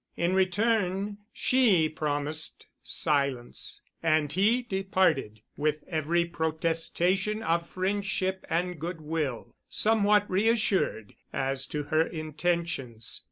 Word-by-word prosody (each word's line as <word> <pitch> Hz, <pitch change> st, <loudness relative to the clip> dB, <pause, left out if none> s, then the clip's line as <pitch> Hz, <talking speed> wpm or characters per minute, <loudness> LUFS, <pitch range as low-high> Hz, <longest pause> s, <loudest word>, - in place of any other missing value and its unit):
In 170 Hz, +2 st, +1 dB
return 200 Hz, +1 st, +1 dB
she 220 Hz, -11 st, +3 dB
promised 150 Hz, 0 st, -2 dB, 0.2 s
silence, 140 Hz, -4 st, -1 dB, 0.2 s
and 155 Hz, -3 st, +2 dB
he 220 Hz, +7 st, +3 dB
departed 190 Hz, -, 0 dB
with 150 Hz, 0 st, -1 dB
every 170 Hz, +1 st, +1 dB
protestation 170 Hz, +5 st, 0 dB
of 170 Hz, +1 st, 0 dB
friendship 190 Hz, 0 st, -1 dB
and 175 Hz, 0 st, -1 dB
good 170 Hz, +2 st, -4 dB
will, 150 Hz, -6 st, -3 dB, 0.2 s
somewhat 210 Hz, -1 st, +3 dB
reassured 200 Hz, -, +1 dB, 0.2 s
as 135 Hz, 0 st, -1 dB
to 150 Hz, -1 st, -3 dB
her 155 Hz, +2 st, +2 dB
intentions. 155 Hz, -, -2 dB
170 Hz, 100 wpm, -28 LUFS, 155-190 Hz, 0.2 s, she